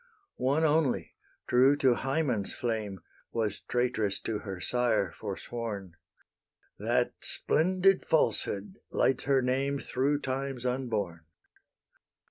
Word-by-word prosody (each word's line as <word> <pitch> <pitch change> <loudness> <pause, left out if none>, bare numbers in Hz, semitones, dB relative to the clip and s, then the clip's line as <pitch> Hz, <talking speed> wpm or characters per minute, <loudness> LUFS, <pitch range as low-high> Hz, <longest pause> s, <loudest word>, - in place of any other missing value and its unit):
One 140 +5 +2
only, 155 -4 +2 0.3
true 130 +3 +5
to 130 -3 +4
Hymen's 135 -6 -1
flame, 110 -6 -3 0.3
Was 110 -3 -1
traitress 120 -5 0
to 110 -2 -2
her 95 -4 -6
sire 120 -3 +1
forsworn: 105 -7 -5 0.8
That - - +1
splendid 185 +3 +2
falsehood 115 - +1
lights 130 -2 +1
her 135 -1 +3
name 135 +3 +1
Through 140 +2 0
times 135 -1 -3
unborn. 110 -10 -2
125 Hz, 100 wpm, -30 LUFS, 110-140 Hz, 0.8 s, true